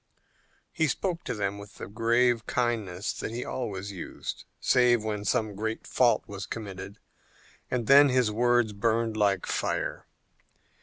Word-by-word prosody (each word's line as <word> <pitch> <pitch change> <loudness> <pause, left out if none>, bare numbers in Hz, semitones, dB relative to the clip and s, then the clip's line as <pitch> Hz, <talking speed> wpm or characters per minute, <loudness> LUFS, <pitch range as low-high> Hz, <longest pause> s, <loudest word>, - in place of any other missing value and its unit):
He 160 - +1
spoke 175 +2 -2
to - - -2
them 100 -1 -2
with 100 0 -12
the - - -7
grave 115 +2 +2
kindness 110 -6 -1
that - - -5
he 120 +2 -4
always 100 -5 -4
used, 90 -4 -6
save 120 -3 +4
when 105 -1 -3
some 105 +1 +1
great 110 +3 -4
fault 120 -2 +3
was 100 -2 -7
committed, 100 -2 -7 0.7
and 125 -2 -1
then 140 +3 +8
his 125 -4 +2
words 120 0 +2
burned 115 +2 0
like 100 -3 +2
fire. - - -2
110 Hz, 145 wpm, -28 LUFS, 100-120 Hz, 0.7 s, then